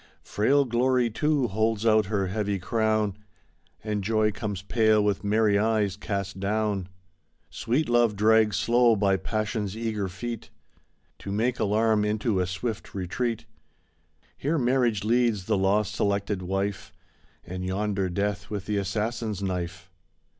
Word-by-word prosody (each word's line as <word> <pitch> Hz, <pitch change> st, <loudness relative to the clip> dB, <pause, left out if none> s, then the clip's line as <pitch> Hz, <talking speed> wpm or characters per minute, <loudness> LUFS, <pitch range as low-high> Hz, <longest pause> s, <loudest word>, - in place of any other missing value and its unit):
Frail 140 Hz, +7 st, +2 dB
Glory, 125 Hz, 0 st, +1 dB
too, 145 Hz, +3 st, +1 dB
holds 110 Hz, +1 st, 0 dB
out 110 Hz, -2 st, +4 dB
her 100 Hz, -2 st, 0 dB
heavy 100 Hz, +1 st, -1 dB
crown. 110 Hz, 0 st, 0 dB, 0.7 s
And 105 Hz, -2 st, -2 dB
Joy 110 Hz, +1 st, +2 dB
comes 100 Hz, -3 st, -5 dB
pale 110 Hz, 0 st, +3 dB
with 105 Hz, -1 st, 0 dB
merry 105 Hz, 0 st, +3 dB
eyes 105 Hz, -3 st, +1 dB
cast 100 Hz, -2 st, -4 dB
down. 100 Hz, -2 st, -1 dB, 0.6 s
Sweet 130 Hz, +7 st, -1 dB
Love 120 Hz, -3 st, +3 dB
drags 110 Hz, -1 st, +4 dB
slow 120 Hz, +2 st, +4 dB
by 100 Hz, -2 st, +2 dB
passion's 110 Hz, -1 st, -3 dB
eager 110 Hz, -4 st, -2 dB
feet 115 Hz, +5 st, -6 dB, 0.7 s
To 100 Hz, -, -6 dB
make 120 Hz, +5 st, 0 dB
alarm 110 Hz, +1 st, +2 dB
into 105 Hz, -1 st, 0 dB
a 90 Hz, -, 0 dB
swift 105 Hz, +5 st, -5 dB
retreat. 110 Hz, +5 st, -2 dB, 0.9 s
Here 155 Hz, +4 st, -1 dB
Marriage 120 Hz, -5 st, +1 dB
leads 115 Hz, -3 st, +1 dB
the 110 Hz, -, +1 dB
law 100 Hz, +2 st, +2 dB
selected 100 Hz, -2 st, -1 dB
wife. 95 Hz, +2 st, -3 dB, 0.5 s
And 90 Hz, +1 st, -6 dB
yonder 95 Hz, 0 st, -1 dB
Death 100 Hz, +1 st, -2 dB
with 100 Hz, -3 st, -4 dB
the 105 Hz, +1 st, -1 dB
assassin's 105 Hz, +1 st, -2 dB
knife." 90 Hz, 0 st, -4 dB
105 Hz, 135 wpm, -26 LUFS, 100-115 Hz, 0.9 s, out